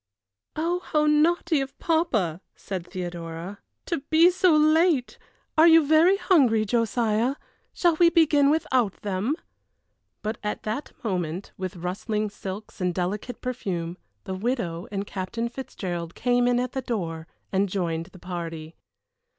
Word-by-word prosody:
"Oh, 340 Hz, +3 st, 0 dB
how 300 Hz, -4 st, 0 dB
naughty 305 Hz, 0 st, +3 dB
of 270 Hz, 0 st, -6 dB
papa," 220 Hz, -, 0 dB
said 185 Hz, -3 st, -6 dB
Theodora, 175 Hz, +1 st, -6 dB, 0.3 s
"to 335 Hz, -, -1 dB
be 330 Hz, +3 st, +6 dB
so 360 Hz, -2 st, +4 dB
late! 310 Hz, -3 st, +3 dB, 0.4 s
Are 320 Hz, +2 st, +7 dB
you 325 Hz, -2 st, +7 dB
very 320 Hz, +6 st, +5 dB
hungry, 255 Hz, -, +3 dB
Josiah? 230 Hz, +2 st, +1 dB, 0.4 s
Shall 345 Hz, -3 st, +2 dB
we 340 Hz, 0 st, +6 dB
begin 305 Hz, -4 st, +4 dB
without 260 Hz, -9 st, +1 dB
them?" 205 Hz, +8 st, -1 dB, 0.9 s
But 215 Hz, +1 st, -3 dB
at 210 Hz, 0 st, -3 dB
that 220 Hz, +7 st, -4 dB
moment, 180 Hz, -3 st, -3 dB
with 185 Hz, -1 st, -5 dB
rustling 205 Hz, +4 st, -2 dB
silks 200 Hz, 0 st, -8 dB
and 180 Hz, -1 st, 0 dB
delicate 200 Hz, +7 st, -3 dB
perfume, 180 Hz, -9 st, -3 dB, 0.3 s
the 190 Hz, -, -5 dB
widow 185 Hz, -5 st, -2 dB
and 200 Hz, 0 st, -2 dB
Captain 200 Hz, +5 st, -3 dB
Fitzgerald 180 Hz, -9 st, -5 dB
came 245 Hz, 0 st, +2 dB
in 245 Hz, 0 st, +3 dB
at 250 Hz, 0 st, -2 dB
the 265 Hz, -, -3 dB
door 165 Hz, -10 st, -4 dB, 0.2 s
and 195 Hz, +1 st, +1 dB
joined 170 Hz, -3 st, -2 dB
the -, -, -15 dB
party. 165 Hz, -3 st, -6 dB
220 Hz, 140 wpm, -25 LUFS, 185-300 Hz, 0.9 s, Are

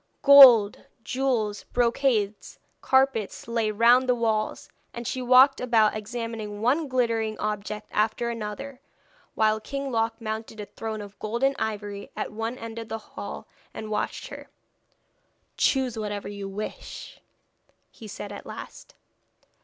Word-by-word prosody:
Gold, 255 Hz, -7 st, +8 dB, 0.2 s
jewels, 240 Hz, -6 st, -1 dB
brocades, 235 Hz, -4 st, 0 dB, 0.2 s
carpets, 265 Hz, -7 st, +1 dB
lay 230 Hz, -2 st, 0 dB
round 240 Hz, +4 st, +4 dB
the 250 Hz, -, +4 dB
walls, 220 Hz, -2 st, -1 dB, 0.3 s
and 235 Hz, 0 st, -6 dB
she 255 Hz, -, -3 dB
walked 255 Hz, +2 st, +6 dB
about 225 Hz, -4 st, +3 dB
examining 220 Hz, -1 st, -5 dB
one 275 Hz, +8 st, +1 dB
glittering 230 Hz, -4 st, 0 dB
object 210 Hz, 0 st, -4 dB
after 220 Hz, +2 st, 0 dB
another, 235 Hz, +5 st, -6 dB, 0.5 s
while 215 Hz, 0 st, +2 dB
King 275 Hz, +4 st, -5 dB
Loc 225 Hz, -1 st, -1 dB
mounted 220 Hz, -1 st, -5 dB
a 210 Hz, -, -5 dB
throne 220 Hz, 0 st, -6 dB
of 205 Hz, 0 st, -11 dB
gold 230 Hz, +4 st, -3 dB
and 275 Hz, 0 st, +3 dB
ivory 205 Hz, -2 st, -4 dB
at -, -, -4 dB
one 225 Hz, +3 st, -4 dB
end 230 Hz, -1 st, -7 dB
of 225 Hz, -1 st, -8 dB
the 225 Hz, -, -3 dB, 0.2 s
hall, -, -, -7 dB, 0.3 s
and 215 Hz, 0 st, -6 dB
watched 210 Hz, -, -3 dB
her. -, -, -10 dB, 1.1 s
'Choose 260 Hz, -5 st, +1 dB
whatever 205 Hz, -1 st, -4 dB
you 200 Hz, -1 st, -6 dB
wish,' 210 Hz, +2 st, -8 dB, 0.7 s
he 220 Hz, -, -12 dB
said 205 Hz, 0 st, -7 dB
at 205 Hz, -, -9 dB
last. -, -, -10 dB
225 Hz, 135 wpm, -26 LUFS, 215-245 Hz, 1.1 s, Gold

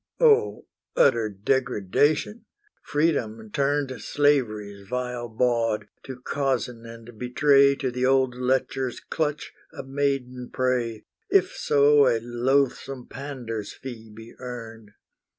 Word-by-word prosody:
O 455 Hz, -2 st, +3 dB, 0.3 s
utter 115 Hz, -5 st, +3 dB
degradation! 130 Hz, -, 0 dB, 0.4 s
Freedom 115 Hz, -9 st, -1 dB
turned 140 Hz, +1 st, 0 dB
Slavery's 110 Hz, -9 st, 0 dB
vile 125 Hz, 0 st, -3 dB
bawd, 115 Hz, -1 st, 0 dB, 0.2 s
to 130 Hz, -2 st, -8 dB
cozen 125 Hz, -3 st, -2 dB
and 115 Hz, -1 st, -12 dB
betray 140 Hz, +2 st, +4 dB
To 135 Hz, -2 st, -2 dB
the 125 Hz, +1 st, -3 dB
old 130 Hz, -1 st, +3 dB
lecher's 130 Hz, 0 st, -1 dB
clutch 150 Hz, -2 st, -3 dB, 0.2 s
a -, -, -8 dB
maiden 135 Hz, -2 st, -2 dB
prey, 125 Hz, -4 st, -1 dB, 0.2 s
If -, -, +3 dB
so 145 Hz, -1 st, +4 dB
a 115 Hz, -2 st, +2 dB
loathsome 125 Hz, +2 st, -1 dB
pander's 120 Hz, -7 st, -6 dB
fee 115 Hz, -4 st, -9 dB
be 110 Hz, +2 st, -12 dB
earned! 115 Hz, -4 st, -8 dB
125 Hz, 110 wpm, -25 LUFS, 115-140 Hz, 0.4 s, betray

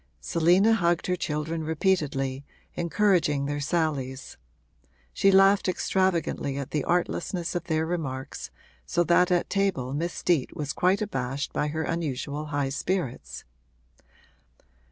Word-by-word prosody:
Selina 180 Hz, +7 st, +3 dB
hugged 175 Hz, -5 st, +1 dB
her 180 Hz, -, +1 dB
children 160 Hz, -1 st, -3 dB
repeatedly, 150 Hz, -5 st, 0 dB, 0.3 s
encouraging 170 Hz, -5 st, +1 dB
their 145 Hz, +1 st, -2 dB
sallies; 140 Hz, -4 st, -2 dB, 0.8 s
she 195 Hz, -, +3 dB
laughed 195 Hz, +1 st, +5 dB
extravagantly 175 Hz, -7 st, 0 dB
at 140 Hz, -1 st, -5 dB
the 150 Hz, -3 st, 0 dB
artlessness 175 Hz, 0 st, -1 dB
of 175 Hz, -1 st, -3 dB
their 160 Hz, -2 st, 0 dB
remarks, 140 Hz, -6 st, -4 dB, 0.4 s
so 175 Hz, -, +2 dB
that 175 Hz, +2 st, +4 dB
at 175 Hz, -1 st, +2 dB
table 190 Hz, -11 st, 0 dB
Miss 170 Hz, +4 st, -2 dB
Steet 165 Hz, -8 st, 0 dB
was 145 Hz, -2 st, -3 dB
quite 190 Hz, +4 st, +2 dB
abashed 135 Hz, -7 st, -3 dB
by 150 Hz, -, 0 dB
her 160 Hz, +2 st, -2 dB
unusual 150 Hz, -2 st, -3 dB
high 145 Hz, -2 st, -1 dB
spirits. 145 Hz, -2 st, -3 dB
160 Hz, 125 wpm, -26 LUFS, 140-180 Hz, 0.8 s, laughed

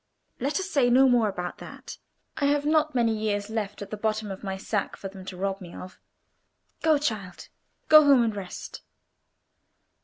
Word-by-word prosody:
Let 280 Hz, +8 st, -1 dB
us 380 Hz, -, -3 dB
say 275 Hz, -9 st, +2 dB
no 260 Hz, +2 st, +6 dB
more 240 Hz, -4 st, +3 dB
about 180 Hz, -2 st, -5 dB
that. -, -, -10 dB, 0.4 s
I 285 Hz, -, -1 dB
have 290 Hz, 0 st, +2 dB
not 310 Hz, -1 st, +2 dB
many 230 Hz, -2 st, +2 dB
years 210 Hz, -1 st, -2 dB
left 210 Hz, -2 st, -3 dB
at 200 Hz, -, -12 dB
the 215 Hz, -, -4 dB
bottom 215 Hz, -1 st, -2 dB
of 190 Hz, -, -8 dB
my 190 Hz, -1 st, -3 dB
sack 205 Hz, +1 st, -2 dB
for 195 Hz, -, -6 dB
them 190 Hz, -1 st, -11 dB
to 185 Hz, -1 st, -8 dB
rob 195 Hz, +1 st, -2 dB
me 175 Hz, -2 st, -10 dB
of. 185 Hz, -, -10 dB, 0.8 s
Go, 315 Hz, -2 st, +4 dB
child; 210 Hz, -11 st, -4 dB, 0.4 s
go 310 Hz, 0 st, +9 dB
home 275 Hz, -4 st, +5 dB
and 220 Hz, -2 st, -1 dB
rest." 190 Hz, -3 st, -7 dB
220 Hz, 185 wpm, -26 LUFS, 195-275 Hz, 0.8 s, go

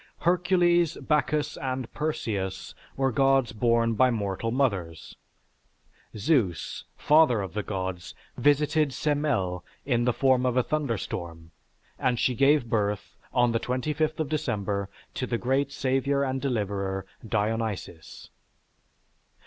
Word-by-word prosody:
Hercules, 175 Hz, -1 st, +3 dB
Bacchus, 150 Hz, -1 st, 0 dB
and 130 Hz, -2 st, -4 dB
Perseus 110 Hz, -11 st, -3 dB, 0.2 s
were 135 Hz, -1 st, +2 dB
gods 135 Hz, 0 st, +3 dB
born 115 Hz, +1 st, +2 dB
by 130 Hz, +3 st, +4 dB
mortal 105 Hz, -1 st, -2 dB
mothers. 100 Hz, -, -1 dB, 1.0 s
Zeus, 105 Hz, -, 0 dB
father 150 Hz, -7 st, +4 dB
of 95 Hz, -, -7 dB
the 105 Hz, -, -1 dB
gods, 95 Hz, -3 st, -5 dB, 0.2 s
visited 150 Hz, 0 st, +2 dB
Semele 130 Hz, -, 0 dB, 0.2 s
in 120 Hz, -3 st, +1 dB
the 125 Hz, -, +3 dB
form 130 Hz, +1 st, +2 dB
of 125 Hz, -1 st, +1 dB
a 125 Hz, -, +4 dB
thunderstorm 95 Hz, -, -3 dB, 0.5 s
and 125 Hz, -1 st, +1 dB
she 125 Hz, -, +2 dB
gave 140 Hz, +1 st, +4 dB
birth, 105 Hz, -3 st, -1 dB, 0.2 s
on 120 Hz, -1 st, +3 dB
the 115 Hz, -, +1 dB
25th 150 Hz, +6 st, -1 dB
of 155 Hz, -, 0 dB
December, 100 Hz, -10 st, -2 dB, 0.2 s
to 130 Hz, -, -3 dB
the 120 Hz, -, -1 dB
great 135 Hz, +4 st, 0 dB
savior 140 Hz, +1 st, 0 dB
and 130 Hz, -1 st, -2 dB
deliverer, 100 Hz, -6 st, -2 dB, 0.2 s
Dionysis. 105 Hz, -6 st, -3 dB
125 Hz, 120 wpm, -27 LUFS, 105-145 Hz, 1.0 s, by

